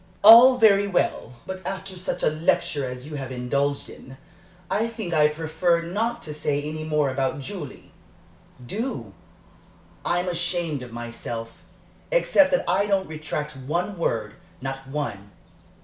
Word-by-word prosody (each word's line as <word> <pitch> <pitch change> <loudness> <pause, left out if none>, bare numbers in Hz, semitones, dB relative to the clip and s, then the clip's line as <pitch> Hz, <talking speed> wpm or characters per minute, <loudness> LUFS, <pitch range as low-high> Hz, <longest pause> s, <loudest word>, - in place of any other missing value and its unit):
"All 235 +4 +10
very 205 -4 +5
well, 175 - -1
but 190 0 -6
after 190 +1 -5
such 180 +1 -4
a - - +3
lecture 155 -3 0
as 125 +1 -7
you 150 0 -6
have 135 -2 -6
indulged 140 +3 -1
in, 130 +1 -12 0.5
I 220 +5 0
think 220 -7 -5
I 150 -1 +5
prefer 160 +2 0
not 220 +8 -2
to 155 - -5
say 145 -1 -1
any 155 +1 -5
more 150 -3 +1
about 135 +1 -1
Julie." 145 -1 -8 0.7
"Do. 225 - -4 0.9
I'm 175 +1 0
ashamed 175 -4 -1
of 125 -1 -9
myself 115 -1 -5 0.6
except - - +4
that 270 - +1
I 190 +4 +2
don't 195 -2 +1
retract 150 -1 -4
one 170 +9 -2
word, 110 -11 -1 0.3
not 135 0 -6
one. 135 -9 -4
155 Hz, 145 wpm, -24 LUFS, 135-190 Hz, 0.9 s, All